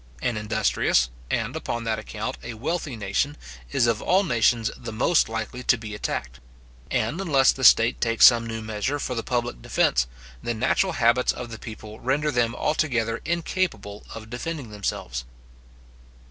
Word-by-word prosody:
An 120 Hz, -, -1 dB
industrious, 105 Hz, -, +1 dB, 0.2 s
and, -, -, -1 dB
upon 120 Hz, 0 st, -3 dB
that 110 Hz, -1 st, -1 dB
account, 110 Hz, 0 st, -5 dB
a 120 Hz, -, -7 dB
wealthy 145 Hz, +3 st, -3 dB
nation, 110 Hz, +8 st, -1 dB, 0.3 s
is 120 Hz, -, +3 dB
of 115 Hz, -2 st, +1 dB
all 190 Hz, +2 st, +3 dB
nations 115 Hz, -, +2 dB
the 120 Hz, -, -7 dB
most 120 Hz, +6 st, +2 dB
likely 115 Hz, +2 st, -4 dB
to 125 Hz, -, +3 dB
be 110 Hz, -1 st, -7 dB
attacked; -, -, -4 dB, 0.5 s
and 115 Hz, -, -1 dB
unless 140 Hz, -8 st, +4 dB
the 130 Hz, -, -6 dB
state 115 Hz, -1 st, +6 dB
takes 115 Hz, -1 st, +5 dB
some 115 Hz, -1 st, +6 dB
new 115 Hz, -1 st, -4 dB
measure 110 Hz, +6 st, -2 dB
for 130 Hz, -, -3 dB
the 115 Hz, -, -2 dB
public 120 Hz, -, -2 dB
defence, -, -, +2 dB, 0.3 s
the 120 Hz, -, -2 dB
natural 150 Hz, -, +1 dB
habits 120 Hz, -1 st, +3 dB
of 120 Hz, -1 st, -7 dB
the 110 Hz, -, -7 dB
people 110 Hz, -1 st, -9 dB
render 145 Hz, +4 st, 0 dB
them 120 Hz, -2 st, +1 dB
altogether 120 Hz, -8 st, 0 dB
incapable 165 Hz, -, -2 dB
of 110 Hz, 0 st, -9 dB
defending 135 Hz, -1 st, -5 dB
themselves. 65 Hz, -12 st, -3 dB
115 Hz, 160 wpm, -25 LUFS, 110-130 Hz, 0.5 s, state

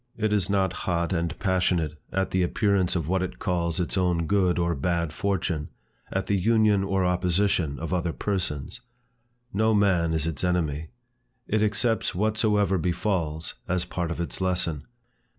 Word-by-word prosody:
It 110 Hz, -2 st, 0 dB
is 100 Hz, -3 st, +2 dB
not 95 Hz, -1 st, +1 dB, 0.2 s
hot 85 Hz, +1 st, 0 dB
and 85 Hz, -1 st, -1 dB
passionate 90 Hz, -5 st, +1 dB, 0.2 s
at 95 Hz, 0 st, -1 dB
the 95 Hz, -, +2 dB
appearance 95 Hz, 0 st, +1 dB
of 80 Hz, -4 st, -1 dB
what 95 Hz, +2 st, +1 dB
it 95 Hz, -, -4 dB
calls 85 Hz, -1 st, -1 dB
its 90 Hz, +2 st, 0 dB
own 90 Hz, -2 st, +1 dB
good 90 Hz, 0 st, +2 dB
or 85 Hz, -1 st, +1 dB
bad 85 Hz, +1 st, -1 dB
fortune, 90 Hz, -5 st, -1 dB, 0.4 s
at -, -, -1 dB
the 100 Hz, -, +1 dB
union 110 Hz, -1 st, +3 dB
or 95 Hz, -1 st, +1 dB
opposition 90 Hz, -4 st, +1 dB
of 80 Hz, +2 st, -4 dB
other 85 Hz, -2 st, 0 dB
persons. 95 Hz, -, -3 dB, 0.7 s
No 110 Hz, +2 st, +3 dB
man 95 Hz, -5 st, +3 dB
is 80 Hz, -1 st, +1 dB
its 80 Hz, -1 st, -2 dB
enemy. 80 Hz, -4 st, 0 dB, 0.6 s
It 110 Hz, 0 st, +1 dB
accepts 110 Hz, 0 st, +1 dB
whatsoever 105 Hz, -2 st, +2 dB
befalls, 85 Hz, -3 st, -1 dB
as 90 Hz, -1 st, 0 dB
part 90 Hz, -1 st, -3 dB
of 85 Hz, -, -4 dB
its 85 Hz, +2 st, -3 dB
lesson. 85 Hz, -6 st, 0 dB
90 Hz, 160 wpm, -26 LUFS, 85-100 Hz, 0.7 s, union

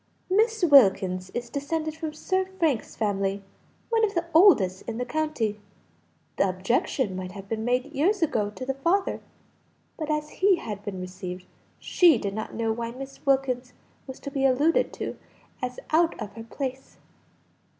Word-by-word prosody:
"Miss 445 Hz, +1 st, +2 dB
Wilkins 190 Hz, -, +5 dB
is 240 Hz, -1 st, -4 dB
descended 310 Hz, +2 st, -2 dB
from 320 Hz, -1 st, -4 dB
Sir 375 Hz, +5 st, -1 dB
Frank's 300 Hz, -10 st, 0 dB
family, 200 Hz, -2 st, -1 dB, 0.5 s
one 450 Hz, -1 st, +3 dB
of 410 Hz, -3 st, +1 dB
the 340 Hz, 0 st, 0 dB
oldest 225 Hz, -, +5 dB
in 225 Hz, -, -4 dB
the 250 Hz, -, -2 dB
county; 245 Hz, -7 st, -1 dB, 0.8 s
the 195 Hz, -, +3 dB
objection 190 Hz, +3 st, 0 dB
might 185 Hz, -1 st, -5 dB
have 195 Hz, -1 st, -9 dB
been 220 Hz, +1 st, -3 dB
made 250 Hz, +5 st, 0 dB
years 350 Hz, +7 st, +2 dB
ago 215 Hz, -9 st, +1 dB
to 235 Hz, +5 st, -7 dB
the 270 Hz, -, -1 dB
father, 340 Hz, +9 st, 0 dB, 0.8 s
but 310 Hz, -1 st, -3 dB
as 300 Hz, 0 st, -1 dB
he 390 Hz, 0 st, +6 dB
had 210 Hz, -, -6 dB
been 200 Hz, -3 st, -5 dB
received, 185 Hz, 0 st, -7 dB, 0.3 s
she 345 Hz, -3 st, +4 dB
did 200 Hz, -1 st, -3 dB
not 215 Hz, +1 st, -5 dB
know 225 Hz, 0 st, 0 dB
why 230 Hz, +1 st, -4 dB
Miss 270 Hz, +3 st, -9 dB
Wilkins 255 Hz, -2 st, +1 dB, 0.3 s
was 265 Hz, -, -8 dB
to 280 Hz, -, -6 dB
be 275 Hz, -1 st, -1 dB
alluded 275 Hz, +5 st, +3 dB
to -, -, -5 dB, 0.4 s
as 250 Hz, 0 st, -4 dB
out 330 Hz, +1 st, +3 dB
of 200 Hz, -, -6 dB
her 225 Hz, +1 st, -9 dB
place." 265 Hz, +2 st, -6 dB
255 Hz, 165 wpm, -26 LUFS, 205-315 Hz, 0.8 s, he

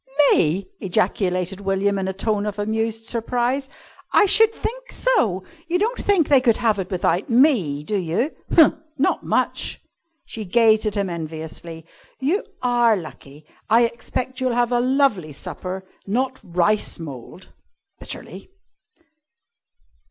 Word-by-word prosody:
"Me!" 170 Hz, +5 st, +2 dB
ejaculated 185 Hz, -1 st, -1 dB
William 195 Hz, 0 st, 0 dB
in 190 Hz, -, -2 dB
a -, -, 0 dB
tone 210 Hz, +1 st, -1 dB
of 210 Hz, -, -4 dB
amused 220 Hz, +1 st, -2 dB
surprise. 245 Hz, +4 st, -1 dB, 0.4 s
"I 420 Hz, -, +5 dB
should 445 Hz, +3 st, +5 dB
think -, -, -6 dB
so! 225 Hz, -, +1 dB, 0.2 s
You 345 Hz, +2 st, +1 dB
don't 445 Hz, +6 st, 0 dB
think 385 Hz, -7 st, +2 dB
they 275 Hz, -3 st, +5 dB
could 235 Hz, -4 st, +3 dB
have 220 Hz, -4 st, +1 dB
it 185 Hz, -1 st, -4 dB
without 180 Hz, -1 st, 0 dB
me, 230 Hz, -, +3 dB
do 205 Hz, +6 st, -1 dB
you? 185 Hz, -, -1 dB, 0.2 s
Huh! 320 Hz, -3 st, +6 dB, 0.2 s
Not 280 Hz, -, +1 dB
much!" -, -, -1 dB, 0.5 s
She 220 Hz, -, -6 dB
gazed 220 Hz, +2 st, +3 dB
at 210 Hz, -, -2 dB
him 200 Hz, -1 st, 0 dB
enviously. 160 Hz, 0 st, -7 dB, 0.3 s
"You 310 Hz, +10 st, 0 dB, 0.2 s
are 240 Hz, -3 st, +3 dB
lucky! 150 Hz, -3 st, -11 dB, 0.2 s
I 230 Hz, +2 st, +5 dB
expect 250 Hz, +2 st, -3 dB
you'll 255 Hz, -2 st, 0 dB
have 240 Hz, 0 st, +1 dB
a 245 Hz, -, +2 dB
lovely 245 Hz, -, +1 dB
supper 185 Hz, +6 st, -6 dB, 0.2 s
not 260 Hz, +5 st, -1 dB
rice 180 Hz, +5 st, +1 dB
mould," 150 Hz, +3 st, -10 dB, 0.5 s
bitterly. -, -, -8 dB
215 Hz, 135 wpm, -22 LUFS, 185-255 Hz, 0.5 s, Huh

